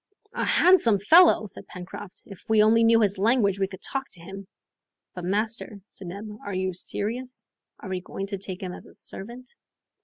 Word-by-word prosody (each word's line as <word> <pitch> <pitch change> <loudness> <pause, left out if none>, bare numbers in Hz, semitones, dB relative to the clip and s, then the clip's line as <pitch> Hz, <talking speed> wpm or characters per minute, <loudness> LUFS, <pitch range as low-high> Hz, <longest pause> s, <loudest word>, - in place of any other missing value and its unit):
"A - - -2
handsome 350 - +5
fellow!" 315 - +6
said 200 - -7
Pencroft; 185 +2 -10
"if 195 -1 -13
we 220 -1 +5
only 225 +2 +4
knew 230 0 +5
his 200 -2 +1
language, 205 -2 +2
we 195 - +1
could 190 0 -12
talk 270 -1 -3
to 180 - -8
him." 195 +2 -9 0.7
"But, 180 -1 -7
master," 215 +2 -1
said 190 - -10
Neb, 200 +5 -7 0.2
"are 200 -2 -5
you 185 0 -1
serious? 240 +8 -3 0.3
Are - - -9
we 185 -1 -3
going 195 +2 -6
to 200 -1 -5
take 190 -1 -6
him 180 -1 -4
as - - -9
a - - -14
servant?" 240 +6 -7
200 Hz, 190 wpm, -25 LUFS, 190-230 Hz, 0.7 s, fellow